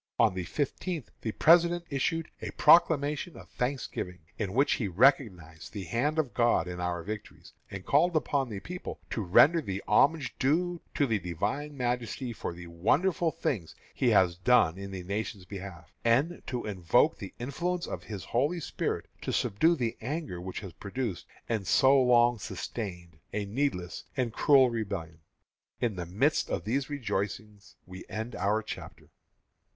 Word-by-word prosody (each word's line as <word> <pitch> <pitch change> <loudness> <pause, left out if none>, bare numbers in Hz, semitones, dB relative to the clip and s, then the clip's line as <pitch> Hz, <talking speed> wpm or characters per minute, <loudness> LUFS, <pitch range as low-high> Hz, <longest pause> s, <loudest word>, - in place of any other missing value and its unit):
On 115 -4 +4
the 90 -1 -4
fifteenth 150 - -3
the 110 - -2
President 170 +6 +4
issued 165 +4 -1
a - - -4
proclamation 150 -1 +4
of - - -12
Thanksgiving, 125 -8 -3 0.2
in 100 -3 -3
which 135 +5 +3
he 110 - -1
recognized 95 - +1
the 100 -3 -5
hand 140 - -1
of 145 -6 0
God 120 -8 +2
in 90 0 -5
our 90 -1 -2
victories, 105 +2 -8 0.2
and 95 -1 -7
called 170 +4 +3
upon 140 -4 +1
the 105 -3 -5
people 180 - -7
to 115 - -1
"render 145 - +5
the 100 -7 -4
homage 145 +6 +3
due 170 +5 +1
to 145 - +3
the 115 -5 0
Divine 105 - -3
Majesty 125 0 -2
for 105 - -5
the 85 0 -9
wonderful 155 - +1
things 105 - -3 0.2
He 125 - +2
has 95 -5 +4
done 90 -4 +4
in 100 +1 -7
the 95 -2 -6
nation's 100 0 -4
behalf, 90 -3 -9
and 135 +9 +2
to 125 -2 -3
invoke 105 - +2
the 100 -4 -8
influence 170 +8 -2
of - - -5
His 105 -4 -7
Holy 145 +9 0
Spirit 160 - -3 0.2
to - - -3
subdue 160 +13 +2
the 120 -5 -2
anger 135 - -4
which 95 +2 -6
has 95 -5 -8
produced, 105 -2 -4 0.2
and 110 -5 -2
so 135 0 +5
long 120 -2 +4
sustained, 90 -6 -6
a 105 -1 -1
needless 100 -5 -2
and 120 -4 0
cruel 135 -2 +5
rebellion." 95 -8 -4 0.6
In 115 -4 0
the 90 -2 -5
midst 125 - +1
of - - -2
these 130 +6 -1
rejoicings 105 -6 -4
we 95 0 -9
end 110 +2 -5
our 105 +2 +1
chapter. - - -9
115 Hz, 165 wpm, -29 LUFS, 95-140 Hz, 0.6 s, render